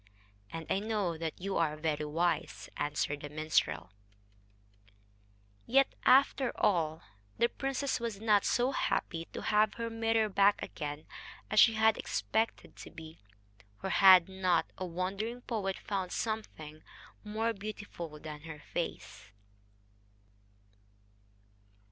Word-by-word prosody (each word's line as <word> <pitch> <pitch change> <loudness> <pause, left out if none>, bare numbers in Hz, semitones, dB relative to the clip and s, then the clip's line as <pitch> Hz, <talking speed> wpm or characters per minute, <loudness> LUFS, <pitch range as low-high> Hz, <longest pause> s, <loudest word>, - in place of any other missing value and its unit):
"And 165 -1 -6
I 195 - +1
know 205 -5 -1
that 160 -1 -5
you 195 +2 -2
are 155 -2 +1
very 155 -1 -1
wise," 170 +4 -1
answered 145 0 -2
the 145 - -6
minstrel. 100 - 0 1.8
Yet, 270 +2 +4
after 265 -1 +5
all, 160 -5 +1 0.3
the 235 - +4
princess 270 +1 -2
was 230 -4 -4
not 210 -2 +3
so 245 +2 +2
happy 165 -10 -1
to - - -8
have 215 0 +3
her 230 -1 -4
mirror 225 -1 +1
back 200 0 +4
again 150 -1 -6 0.5
as 215 - +4
she 225 - +7
had 220 0 +3
expected 225 +1 -2
to - - -10
be; 160 0 -11 0.6
for 190 - -3
had 185 -3 +8
not 185 -3 +1
a 185 - -5
wandering 195 +7 -3
poet 200 -6 -2
found 190 -3 -3
something 160 -9 -4 0.4
more 220 +2 -1
beautiful 200 -6 -7
than 150 -1 -8
her 160 0 -8
face! 165 -7 -6
190 Hz, 125 wpm, -32 LUFS, 160-220 Hz, 1.8 s, had